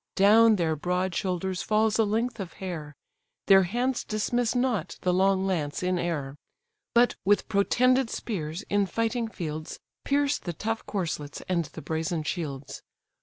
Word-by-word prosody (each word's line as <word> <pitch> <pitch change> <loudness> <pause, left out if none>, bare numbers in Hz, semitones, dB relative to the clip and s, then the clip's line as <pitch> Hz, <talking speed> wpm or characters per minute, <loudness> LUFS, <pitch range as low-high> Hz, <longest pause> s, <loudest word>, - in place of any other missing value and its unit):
Down 220 +3 +6
their 165 -4 0
broad 180 +4 -1
shoulders 185 +1 -2
falls 215 +1 +2
a - - +6
length 225 +3 -1
of 185 -3 -6
hair; 160 -6 -6 0.5
Their 195 -1 +7
hands 240 +7 -1
dismiss 230 +3 -1
not 230 -10 0
the 180 - +1
long 190 +1 +3
lance 160 -5 -2
in 180 -1 +1
air; 145 -5 -3 0.6
But 240 +1 +5
with 205 +2 +2
protended 255 +5 +3
spears 170 -6 -4
in 205 -2 +1
fighting 230 +4 -1
fields 155 -7 -6 0.2
Pierce 285 0 +1
the 175 - -5
tough 220 +7 -3
corslets 160 -7 -3
and 170 -3 0
the 140 - -10
brazen 160 +1 -2
shields. 145 -4 -5
190 Hz, 150 wpm, -27 LUFS, 165-225 Hz, 0.6 s, Their